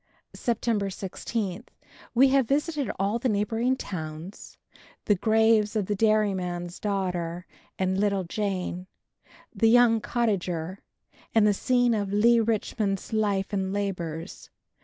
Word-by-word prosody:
September 225 -4 -1
16. 195 +2 -4 0.5
We 265 +3 +6
have 270 -3 +3
visited 290 -2 0
all 200 +4 0
the 255 - 0
neighboring 225 +4 +1
towns, 160 -1 -7 0.5
the 210 - +4
graves 220 +1 +3
of 210 -3 +1
the 205 - -1
Dairyman's 190 -5 0
daughter 180 -4 -2 0.3
and 190 0 0
little 200 -2 +1
Jane, 185 -1 -3 0.7
the 225 - +3
young 235 -1 +5
cottager, 190 -7 -1 0.6
and 220 -2 +5
the 210 - +4
scene 245 +3 +2
of 205 -3 -1
Leigh 230 +3 +4
Richmond's 215 -2 -1
life 205 -2 0
and 190 -1 -1
labors. 180 -4 -4
205 Hz, 120 wpm, -26 LUFS, 185-225 Hz, 0.7 s, We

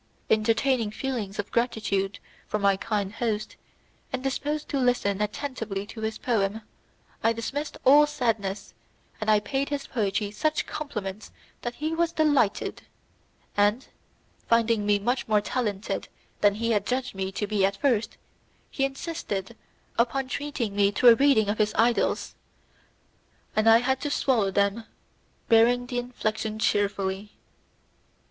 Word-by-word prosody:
Entertaining 225 +2 +2
feelings 215 -3 -4
of 205 - -4
gratitude 205 -5 0 0.3
for - - -1
my 200 -1 +3
kind 205 -1 -2
host, 220 -2 -2 0.6
and 260 0 -3
disposed 295 +3 -2
to 280 - 0
listen 245 -6 +1
attentively 210 -3 -3
to 220 +1 -9
his 220 0 -2
poem, 220 -3 0 0.6
I 225 - +4
dismissed 275 +6 -4
all 295 +3 +7
sadness, 220 -9 -2 0.5
and 215 - -1
I 215 -1 +6
paid 270 +7 -2
his 285 -1 -3
poetry 205 -3 -1
such 310 +8 0
compliments 210 -9 -5 0.3
that 240 0 -4
he 310 +2 -2
was 335 0 0
delighted, 290 -10 +1 0.7
and, 205 +5 +2 0.6
finding 230 -2 +2
me 205 0 +4
much 240 +6 -1
more 215 -1 +4
talented 210 -2 -2 0.3
than 205 -1 +4
he 230 +2 -1
had 205 -2 +1
judged 255 +1 -1
me 190 0 -3
to 205 - -2
be 205 -1 0
at 195 +1 +2
first, 240 -6 0 0.5
he 270 - +1
insisted 270 - -4 0.4
upon 260 +3 +1
treating 280 -7 -3
me 200 0 +3
to 245 +4 +6
a - - +10
reading 270 -5 +4
of 210 +2 -1
his 215 0 +1
idylls, 235 +1 +1 1.2
and 215 +1 +4
I 225 - +8
had 265 +2 0
to 290 - -2
swallow 245 -8 +2
them, 200 +3 0 0.6
bearing 240 +2 +4
the 245 0 -2
infliction 220 -3 -3
cheerfully. 200 -1 0
225 Hz, 140 wpm, -26 LUFS, 205-260 Hz, 1.2 s, a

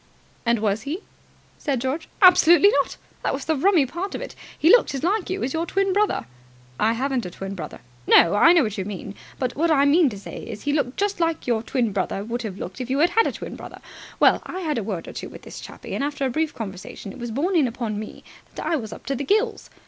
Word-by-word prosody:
"And 235 0 +4
was 210 0 0
he?" 300 - -4 0.6
said 275 -5 -1
George. 265 +6 -3
"Absolutely 360 +1 +8
not! - - -8 0.2
That - - 0
was 270 - -6
the 315 - +1
rummy 330 0 +4
part 345 +9 -5
of - - -5
it. - - -8 0.2
He 320 - +5
looked 480 -11 +5
as 270 - -4
like 385 +2 0
you 375 +1 -2
as 260 - -2
your 330 +1 -1
twin 390 +1 +1
brother." 420 +2 +1 0.5
"I 220 +2 +3
haven't 260 +1 -1
a - - -6
twin 195 +2 -6
brother." 165 -6 -7 0.3
"No, 170 - +6
I 210 +11 +6
know 345 -4 +5
what 215 -3 -3
you - - -1
mean, 200 0 -6 0.2
but 255 -2 -2
what 330 +3 +1
I 285 -3 +4
mean 300 +1 +5
to 205 - -8
say 195 - -8
is 215 -3 -8
he 290 - 0
looked 275 -4 -1
just 405 -2 0
like 330 -1 0
your 235 -3 +1
twin 235 -1 -1
brother 195 0 -2
would 235 +3 -3
have 210 -5 -5
looked 185 +4 -6
if 250 - -5
you 265 - +1
had 330 +4 +4
had 455 - +4
a - - -1
twin - - -7
brother. - - -10 0.4
Well, - - +5
I 375 - -6
had 305 -7 -1
a - - -3
word 190 -5 -4
or - - -8
two - - -6
with - - -12
this - - -9
chappie, - - -9
and - - -1
after 285 -1 -2
a 260 - 0
brief 315 +4 0
conversation 195 -1 -7
it - - -12
was 240 0 -4
borne 310 - -1
in 300 -6 +4
upon 230 -3 -3
me 215 - -8 0.3
that - - -5
I 330 - +1
was 220 -5 -6
up - - -10
to 275 - -1
the 275 - -3
gills. 430 - 0
270 Hz, 260 wpm, -23 LUFS, 220-335 Hz, 0.6 s, Absolutely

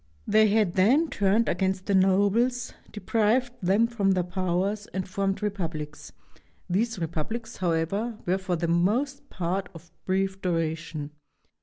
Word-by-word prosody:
They 215 0 +5
had 210 -4 +2
then 265 - +3
turned 205 +3 +2
against 190 +1 0
the 200 - 0
nobles, 205 +6 +2 0.2
deprived 230 +3 +1
them 195 +5 +3
of 195 -1 +3
their 180 - +1
powers, 185 +3 -1
and 190 0 -4
formed 195 +1 -1
republics. 160 -7 -4 0.6
These 225 +5 0
repub 160 -3 -3
lics, 235 -1 -6
however, 185 +6 -1
were 185 +2 +1
for 185 -2 -1
the 170 0 -1
most 235 +12 0
part 185 +1 -2
of 170 +1 -13 0.2
brief 190 0 0
duration. 160 -3 -2
190 Hz, 140 wpm, -27 LUFS, 175-215 Hz, 0.6 s, They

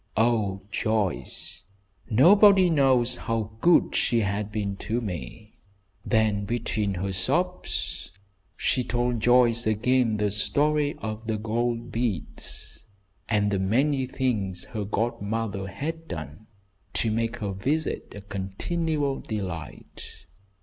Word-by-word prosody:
Oh, 110 -4 +1
Joyce, 110 -3 -2 0.5
nobody 190 - +6
knows 130 -5 +3
how 110 -2 -2
good 175 +4 +4
she 115 -2 +2
has 100 0 -1
been 105 -2 -3
to 115 +4 -2
me!" 100 - -6 0.5
Then 110 -3 +2
between 105 -2 -1
her 95 +2 -2
sobs 175 - -1 0.5
she 125 - +1
told 120 0 0
Joyce 120 0 +4
again 115 +1 +2
the 105 -1 0
story 145 +8 +1
of 110 +1 -5
the 110 -1 0
gold 115 +2 -2
beads, 115 -8 -3 0.5
and 105 -2 +2
the 100 - +1
many 130 +7 +1
things 105 -9 -1
her 105 -3 -4
godmother 105 -1 -2
had 160 +10 -5
done 80 +5 -7 0.5
to 115 - 0
make 115 +1 -1
her 105 -3 -3
visit 140 +11 -2
a 100 - -7
continual 135 - -2
delight. 90 -8 -7
110 Hz, 115 wpm, -26 LUFS, 100-125 Hz, 0.5 s, nobody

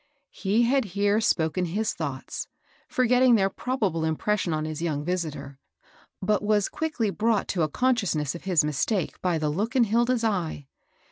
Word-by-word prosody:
He 210 +4 +1
had 265 +3 +3
here 205 +2 +3
spoken 165 -3 +1
his 210 +6 -1
thoughts, 140 -5 -5 0.4
forgetting 250 0 +4
their 195 -2 +2
probable 205 -12 -1
impression 175 +4 0
on 155 0 -1
his 155 0 -5
young 150 -3 -2
visitor, 150 -6 -4 0.6
but 210 +1 +2
was 210 -1 +1
quickly 255 -10 -1
brought 215 0 +1
to 180 - 0
a 155 - +1
consciousness 195 - 0
of 170 - -10
his 175 -6 +3
mistake 150 +5 -1
by 180 -3 +1
the 155 -1 -1
look 210 - -2
in 255 - +5
Hilda's 235 +2 +1
eye. 175 -9 -1
195 Hz, 160 wpm, -26 LUFS, 160-225 Hz, 0.6 s, in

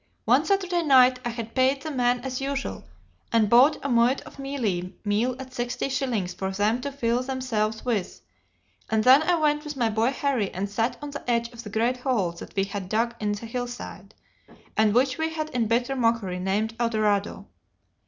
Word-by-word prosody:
One - - +4
Saturday 370 -3 +1
night 260 -4 +5
I 240 - -2
had 230 -1 -6
paid 265 +1 +2
the 315 - -4
men 245 -2 +1
as 260 0 -4
usual, 275 0 -3 0.5
and 225 -2 +3
bought 255 +6 +7
a - - -1
muid 245 +1 +3
of - - -14
mealie 220 -11 -2
meal 220 +5 +1
at 260 -1 -9
sixty 245 +2 -2
shillings 250 -9 -1
for 190 - -3
them 210 +5 0
to 280 - -4
fill 245 -3 0
themselves 250 -5 -2
with, 220 -7 -2 0.7
and 220 -1 +2
then 260 +4 +7
I 350 +3 +2
went 300 -2 +1
with 300 -2 -6
my 230 -3 +1
boy 225 +3 +2
Harry 270 -7 0
and 195 +2 -2
sat 225 +4 -1
on 290 - -5
the 285 -3 -7
edge 235 -1 +1
of 235 - -8
the 210 - -8
great 230 +4 0
hole 245 -9 0
that 170 - -11
we 195 - +2
had 195 -1 -5
dug 230 +3 +1
in 210 -1 -1
the 205 +3 -6
hill 245 +2 -3
side, 245 0 -9 0.6
and 215 -1 +3
which 255 +2 +2
we 320 0 -1
had 310 -1 -4
in 235 -3 0
bitter 245 +4 0
mockery 230 -7 0
named 205 +4 -1
Eldorado. 215 -4 0
240 Hz, 200 wpm, -25 LUFS, 215-270 Hz, 0.7 s, bought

